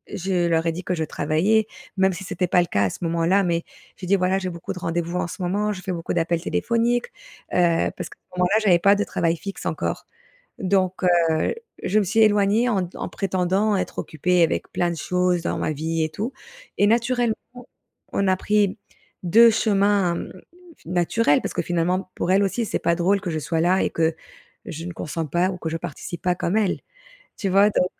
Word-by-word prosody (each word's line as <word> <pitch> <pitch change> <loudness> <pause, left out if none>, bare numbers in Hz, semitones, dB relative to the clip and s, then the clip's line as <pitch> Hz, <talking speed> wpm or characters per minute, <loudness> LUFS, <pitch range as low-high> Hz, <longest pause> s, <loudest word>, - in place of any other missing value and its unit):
je 180 -2 0
leur 165 0 +1
ai 165 - +2
dit 180 +3 -6
que 180 - -1
je 160 - -1
travaillais. 170 +9 +1 0.3
Même 190 0 +3
si 185 +3 -7
c'était 180 -2 -2
pas 175 +1 +4
le - - 0
cas 100 0 +1
à - - +1
ce - - -8
moment-là 170 +4 +2
mais 170 -1 0 0.3
j'ai 180 - -8
dit: 200 - +4
«Voilà 185 +1 +1
j'ai 185 -1 -3
beaucoup 170 0 -6
de 180 - -8
rendez-vous 170 +1 -2
en - - -1
ce 175 - -9
moment, 205 +4 0
je 185 -2 -6
fais 185 - -4
beaucoup 165 0 -3
d'appels 170 0 0
téléphoniques», 235 +4 0 0.4
heu, 170 -2 +2
parce - - -6
qu'à - - -15 0.2
ce 180 - -6
moment-là 180 +5 +3
j'avais 180 -5 +5
pas 200 +3 +5
de 205 - 0
travail 170 -4 0
fixe 195 +2 -7
encore, - - -3 0.5
donc 185 -1 0
heu, 170 - +2 0.3
je 210 - +1
me - - +2
suis 215 +4 0
éloignée 215 +2 +4
en 190 -5 0
en - - -5
prétendant 190 +2 0
être 190 - -3
occupée 175 +3 +1
avec 165 - -1
plein 175 -1 0
de - - -4
choses 180 +2 0
dans - - -2
ma - - -1
vie 160 +2 -1
et 155 - -1
tout, 215 - -4 0.5
et 205 - +4
naturellement, 240 0 +2 0.8
on 200 - +1
a 185 -1 +3
pris 210 0 +1 0.5
2 230 +7 +7
chemins, 200 -4 +2
mmh, - - -6 0.5
naturels 175 0 +2
parce - - -4
que - - +1
finalement, 180 +2 -1
pour 180 - -1
elles 200 +1 +4
aussi 215 +5 -1
c'est - - -1
pas 170 - +1
drôle 190 +3 +1
que 180 -4 -3
je 155 - -2
sois 160 +1 -2
là 185 +3 +3
et - - 0
que, 160 -1 +1 0.5
je 165 +1 -6
ne 175 - -6
consente 160 -1 -5
pas 180 +2 +2
ou 180 - -6
que 165 - -6
je 165 - -2
participe 170 +1 -7
pas 180 -1 +2
comme 175 +4 -1
elles. 205 -4 +1 0.6
Tu 195 - -2
vois? 200 +3 +5
Donc 180 - +2
180 Hz, 215 wpm, -23 LUFS, 170-200 Hz, 0.8 s, 2